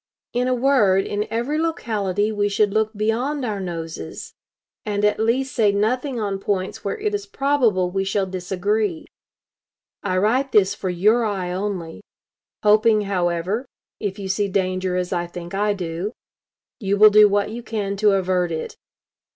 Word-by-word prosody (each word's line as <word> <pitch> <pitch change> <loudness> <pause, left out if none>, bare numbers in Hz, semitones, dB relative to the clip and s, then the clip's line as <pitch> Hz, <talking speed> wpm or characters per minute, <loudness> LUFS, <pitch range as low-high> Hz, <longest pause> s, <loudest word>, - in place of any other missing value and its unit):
In 250 +1 +1
a 255 - +2
word, 235 -7 +3
in 205 +1 -2
every 240 +7 -1
locality 210 - -1
we 205 -1 0
should 205 0 +1
look 220 0 +1
beyond 245 +7 -1
our 210 -3 -2
noses; 165 - -6 0.5
and 210 0 0
at 210 - +2
least 250 +4 +1
say 215 -3 +3
nothing 245 +6 0
on 200 -2 -2
points 195 -1 -2
where - - -2
it 425 -1 -2
is 410 0 -3
probable 245 - +1
we 195 +1 0
shall 195 0 0
disagree. 190 +1 -2 1.0
I 185 -2 -1
write 250 +8 +1
this 200 -2 +4
for 190 - -4
your 210 +7 +3
eye 195 -5 -2
only; 185 -3 -4 0.6
hoping, 215 +1 +5
however, 190 +4 -1 0.3
if 200 -2 -3
you 195 -2 -5
see 200 +2 0
danger 185 -1 -1
as 180 0 -1
I 175 -1 -1
think 175 0 -8
I 205 +1 +1
do, 180 +3 -4 0.7
you 200 -3 0
will 215 +1 +8
do 210 0 +7
what 205 +1 +1
you 235 +2 -6
can 205 -4 -3
to 210 0 +4
avert 185 -2 +1
it. 160 - -4
205 Hz, 165 wpm, -22 LUFS, 185-220 Hz, 1.0 s, will